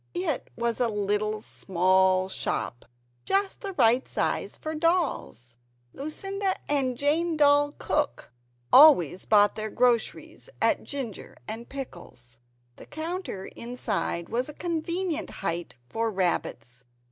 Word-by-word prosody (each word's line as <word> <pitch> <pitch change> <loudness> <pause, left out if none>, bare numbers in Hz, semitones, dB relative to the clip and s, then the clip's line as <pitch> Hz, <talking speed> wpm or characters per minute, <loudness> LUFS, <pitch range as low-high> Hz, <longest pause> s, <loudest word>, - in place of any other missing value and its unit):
It 180 - -2
was 235 0 -1
a 245 - +3
little 210 0 -1
small 185 0 +2
shop 120 -9 -3 0.4
just 390 0 0
the 400 -3 -5
right 245 -4 +3
size - - -1
for 315 - -5
Dolls 305 - -1 0.4
Lucinda 390 +7 -3
and 265 -4 0
Jane 320 +4 +1
Doll 290 0 +4
cook 295 - -2 0.4
always 255 - +7
bought 205 -1 +5
their 215 0 -4
groceries 245 - 0
at - - +2
Ginger 260 -8 -6
and 225 +2 -6
Pickles. 170 - -9 0.4
The - - -13
counter 320 - -5
inside 225 -7 -2
was 245 +5 -2
a 300 - -8
convenient 335 0 -2 0.2
height 170 +1 -2
for 225 - -1
rabbits. 125 - -2
240 Hz, 120 wpm, -27 LUFS, 190-310 Hz, 0.4 s, always